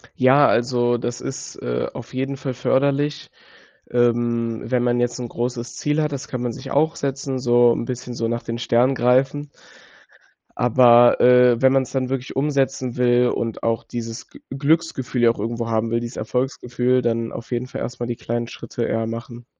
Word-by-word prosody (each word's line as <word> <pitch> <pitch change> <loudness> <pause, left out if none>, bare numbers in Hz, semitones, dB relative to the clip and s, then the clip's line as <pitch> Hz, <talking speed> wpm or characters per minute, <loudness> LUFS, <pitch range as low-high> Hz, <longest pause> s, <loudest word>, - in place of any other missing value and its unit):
Ja, 135 +3 +5
also, 120 0 +1
das 120 0 -4
ist, 135 - -6
äh, - - -3
auf - - -10
jeden 135 +1 -3
Fall 130 0 -4
förderlich. 140 +4 0 0.6
Ähm, 120 -1 0
wenn 125 -1 +1
man 120 0 +1
jetzt 120 +1 -1
‘n 120 - -4
großes 120 0 -4
Ziel 150 +1 0
hat. 150 - -1
Das 140 -1 -5
kann 125 -2 -5
man 120 -1 -2
sich 130 +2 -8
auch 155 +3 +2
setzen, 135 -1 -3
so 120 -1 +4
‘n - - -3
bisschen 125 0 -6
so 115 -1 -2
nach 120 +1 -2
den 115 0 -5
Sternen 125 +2 +2
greifen. 135 +4 +1 1.1
Aber, 120 0 +5
äh, 125 -1 +5
wenn 130 0 +5
man 135 - +4
‘s 125 - -10
dann 130 -2 -1
wirklich 130 -1 -4
umsetzen 135 -3 0
will 125 0 +3
und 115 -2 -3
auch 115 0 0
dieses 115 -1 -7
G - - -15
Glücksgefühl 140 -3 0
ja 115 - +6
auch - - -9
irgendwo 115 +2 -3
haben 115 0 0
will, 115 +1 0
dieses 120 +1 -7
Erfolgsgefühl, 125 +1 -1
dann 115 -1 -1
auf 115 - -8
jeden 120 0 -1
Fall - - -7
erstmal 120 -1 -4
die 120 - -3
kleinen 120 0 -3
Schritte 120 - -6
eher 115 0 -1
machen. 115 +1 -7
125 Hz, 190 wpm, -21 LUFS, 120-130 Hz, 1.1 s, ja